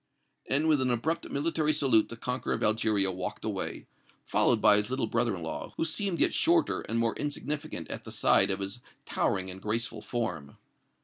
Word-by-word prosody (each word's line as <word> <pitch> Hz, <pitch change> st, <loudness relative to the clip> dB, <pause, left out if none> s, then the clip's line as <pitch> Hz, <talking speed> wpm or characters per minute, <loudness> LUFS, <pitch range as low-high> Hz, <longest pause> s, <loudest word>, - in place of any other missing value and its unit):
And 145 Hz, +4 st, +2 dB
with 150 Hz, -4 st, +3 dB
an 130 Hz, -, +1 dB
abrupt 145 Hz, +8 st, -1 dB
military 155 Hz, +1 st, 0 dB
salute 130 Hz, -7 st, +3 dB
the 115 Hz, -, -8 dB
conqueror 125 Hz, +2 st, -2 dB
of -, -, -4 dB
Algeria 105 Hz, -3 st, +2 dB
walked 90 Hz, 0 st, -5 dB
away, -, -, -3 dB, 0.4 s
followed -, -, +3 dB
by 105 Hz, -, +6 dB
his 105 Hz, 0 st, 0 dB
little 130 Hz, -1 st, 0 dB
brother 115 Hz, -1 st, 0 dB
in 85 Hz, -, -7 dB
law, 80 Hz, -, -6 dB
who -, -, +1 dB
seemed 175 Hz, +2 st, -2 dB
yet -, -, +4 dB
shorter 340 Hz, 0 st, +2 dB
and 115 Hz, -, -3 dB
more 115 Hz, -1 st, +1 dB
insignificant 145 Hz, -, -4 dB
at -, -, -5 dB
the -, -, -9 dB
side -, -, +4 dB
of 95 Hz, 0 st, -1 dB
his 100 Hz, +4 st, -4 dB, 0.3 s
towering 95 Hz, -1 st, 0 dB
and 95 Hz, +1 st, -9 dB
graceful 115 Hz, +3 st, -2 dB
form. 90 Hz, -, -4 dB
115 Hz, 190 wpm, -29 LUFS, 105-145 Hz, 0.4 s, by